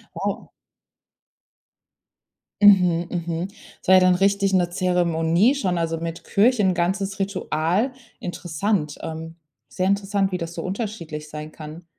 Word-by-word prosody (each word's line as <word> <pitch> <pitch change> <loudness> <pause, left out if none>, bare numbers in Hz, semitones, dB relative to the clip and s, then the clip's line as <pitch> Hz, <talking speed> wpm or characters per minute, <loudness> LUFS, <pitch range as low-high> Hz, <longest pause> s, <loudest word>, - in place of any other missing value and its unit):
Wow. - - -3 2.1
Mhm, 180 -4 +5
mhm, 170 0 -3 0.3
das - - -19
war 185 - +7
ja - - +8
dann 185 0 +5
richtig 195 +1 +2
'ne 175 -2 +3
Zeremonie 175 - +2
schon, 185 -10 -1
also, 165 -1 -1
mit 165 0 -5
Kirche- 225 +3 +3
'n 185 -1 +3
ganzes 195 +3 -1
Ritual. 195 - 0 0.3
Interessant. 175 -1 -2
Ähm, 160 0 -6 0.3
sehr 185 +1 -2
interessant, 200 0 +1
wie 180 - -1
das 165 -1 -5
so 165 - -5
unterschiedlich 185 -7 -5
sein 150 0 -7
kann. 155 +3 -10
180 Hz, 135 wpm, -23 LUFS, 165-195 Hz, 2.1 s, ja